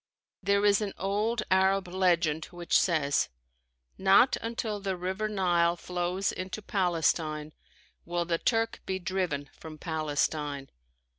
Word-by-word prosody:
There 200 +1 +2
is 205 +1 +4
an 205 -2 -3
old 215 +4 0
Arab 190 0 +3
legend 175 -4 +1
which 175 -1 -3
says: 155 -5 +2 0.7
"Not 195 +7 +5
until 225 -2 -3
the 195 -2 -3
River 190 +4 -2
Nile 175 -4 +2
flows 180 +2 -2
into 185 +3 -6
Palestine 160 -5 0 0.5
will 175 0 -2
the 165 -1 0
Turk 225 -1 0
be 190 - -1
driven 180 -7 -2
from 155 -1 -10
Palestine." 150 -3 -2
180 Hz, 125 wpm, -29 LUFS, 160-195 Hz, 0.7 s, Not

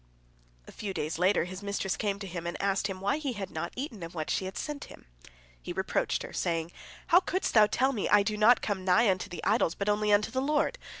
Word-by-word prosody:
A - - -10
few 200 -3 -5
days 155 +2 -3
later 185 +2 +3
his 185 +2 -7
mistress 200 -1 -2
came 200 -2 -1
to 200 - -7
him, 170 -2 -5
and 170 - -4
asked 195 0 +1
him 190 -2 -6
why 200 +8 +1
he 280 -4 -2
had 200 -3 -6
not 160 +2 -4
eaten 250 - -5
of 165 +1 -7
what 155 -2 -3
she 190 - 0
had 190 - -6
sent 295 -2 -4
him. - - -14 0.6
He - - -5
reproached - - -1
her, - - -9
saying, 165 -1 -1 0.4
"How 355 0 +8
couldst 370 0 -2
thou 215 -2 +7
tell 265 +5 +1
me, 210 - -2
I 210 -1 +6
do 215 +1 -1
not 215 +4 +5
come 200 -3 -2
nigh 195 +4 +4
unto 185 -1 -3
the 175 - -7
idols, 205 -5 +2
but 200 +1 -2
only 210 0 +2
unto 205 +2 +3
the 260 +2 -1
Lord? 300 - 0
200 Hz, 245 wpm, -29 LUFS, 185-225 Hz, 0.6 s, How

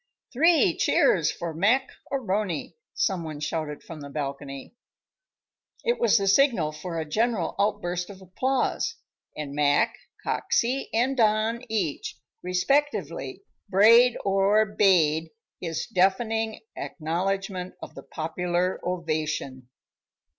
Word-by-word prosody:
"Three 325 +6 +4
cheers - - +3
for 170 -1 -5
Mac 230 +11 +2 0.2
A'Rony!" 205 - -2 0.2
some 190 -5 0
one 155 -2 -6
shouted 150 -1 -4
from 160 -3 -9
the 140 - -8
balcony. 140 - -6 1.1
It 475 0 +1
was 475 - +4
the 200 -1 0
signal 200 - +3
for 165 +2 -6
a 160 - -2
general 215 +1 0
outburst 180 -3 -1
of 195 -2 -10
applause; 250 +8 -1 0.4
and 145 -2 -5
Mac, 145 0 +2 0.3
Coxey 255 +3 0
and 250 +4 +1
Don, 220 0 +2
each, 195 -9 -2 0.2
respectively, 275 - -1 0.3
brayed 230 +5 +6
or 200 +2 +3
bayed 165 -6 +3 0.3
his 165 -2 -3
deafening 220 +4 +1
acknowledgment 185 +3 -3
of - - -9
the - - -9
popular 175 +3 -2
ovation. 155 -7 -3
185 Hz, 110 wpm, -26 LUFS, 160-225 Hz, 1.1 s, brayed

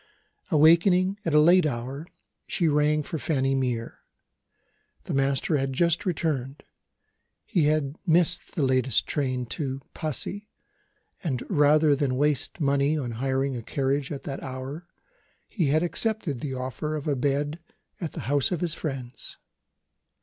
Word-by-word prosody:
Awakening 180 +4 +4
at 165 -3 +1
a - - +8
late 175 +2 +6
hour, 135 +4 -5 0.4
she 170 - +1
rang 150 0 +2
for 160 - -5
Fanny 135 0 0
Mere. 125 -4 -2 1.0
The - - -5
master 135 +3 +1
had 135 -1 -1
just 170 +5 +1
returned. 150 -6 -2 0.8
He 175 -9 +1
had 150 -1 0
missed 175 +2 +2
the 155 - 0
latest 130 -1 +2
night - - -17
train 130 -4 -1
to 135 +2 -3
Passy; 185 - -3 0.7
and, 130 -8 -2
rather 150 -2 +5
than 135 -2 0
waste 150 +3 0
money 140 +1 +2
on 125 -5 -3
hiring 135 +3 -1
a 120 - -4
carriage 135 +3 -1
at 140 - -5
that 135 -1 -5
hour, 135 +6 -6 0.6
he 175 -9 -1
had 155 +4 +2
accepted 180 - -1
the 135 0 -4
offer 130 +4 -3
of 150 0 -5
a 145 - +1
bed 145 +4 -1 0.4
at 165 -4 -4
the - - -5
house 145 +3 +1
of 175 - -1
his 170 -3 -1
friends. 135 -7 -6
145 Hz, 150 wpm, -26 LUFS, 135-160 Hz, 1.0 s, a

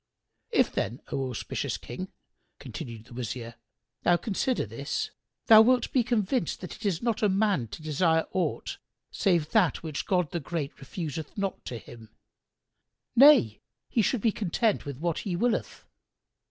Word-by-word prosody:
"If - - +3
then, 115 +7 -2
O 135 -1 -1
auspicious 120 - -3
King," - - -7 0.5
continued 115 -3 -8
the 120 - -14
Wazir, 120 0 -5 0.5
"thou 175 - +4
consider 240 +6 -1
this, - - -3 0.3
thou 220 -1 +9
wilt 245 +2 +3
be 255 - +4
convinced 230 - 0
that 180 - -6
it 215 -1 -3
is 180 -1 -1
not 230 -3 0
for 210 - +3
a - - +1
man 195 - +1
to 155 - -9
desire 160 +1 +2
aught 185 - -2 0.3
save 170 -7 +1
that 205 -7 +3
which 155 -3 -4
God 180 -6 +1
the 170 - -2
Great 155 -2 -4
refuseth 155 +2 -6
not 195 -1 -2
to 120 - -5
him; 115 -1 -12 1.1
nay, 255 - +7 0.3
he 230 - +2
should 220 +2 +1
be 225 - +3
content 210 +2 0
with 140 -3 -5
what 165 +2 -1
He 190 -5 -3
willeth. 235 +6 -1
175 Hz, 160 wpm, -28 LUFS, 140-220 Hz, 1.1 s, thou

